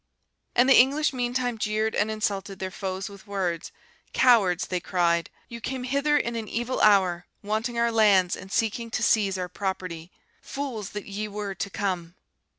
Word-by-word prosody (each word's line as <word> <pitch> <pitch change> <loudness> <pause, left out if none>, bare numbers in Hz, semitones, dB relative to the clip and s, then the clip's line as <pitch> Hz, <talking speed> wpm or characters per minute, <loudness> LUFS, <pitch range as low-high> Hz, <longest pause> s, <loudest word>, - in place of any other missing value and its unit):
And 245 +2 +5
the 270 - +8
English 280 +4 +3
meantime 245 -1 -1
jeered 215 +1 0
and 205 +1 +1
insulted 200 -2 -2
their 190 0 -4
foes 190 0 -4
with 200 +1 -13
words. 185 -4 -2 0.4
'Cowards,' 205 -8 +4
they 180 - -2
cried, 170 -2 +1 0.2
'you 235 0 -9
came 260 +1 -4
hither 280 +3 +2
in 235 -4 -1
an 225 -2 -4
evil 240 +4 -2
hour, 185 -4 +4 0.2
wanting 220 +3 -2
our 235 0 +2
lands, 200 -5 +4
and 190 - -11
seeking 230 +2 -1
to - - -2
seize 200 -3 +3
our 180 -1 -3
property, 180 -2 -5 0.3
fools 255 -8 -5
that 210 -1 -5
ye 210 +1 -4
were 205 -1 -4
to 195 +2 -4
come! 185 -4 -3
210 Hz, 170 wpm, -26 LUFS, 190-235 Hz, 0.4 s, the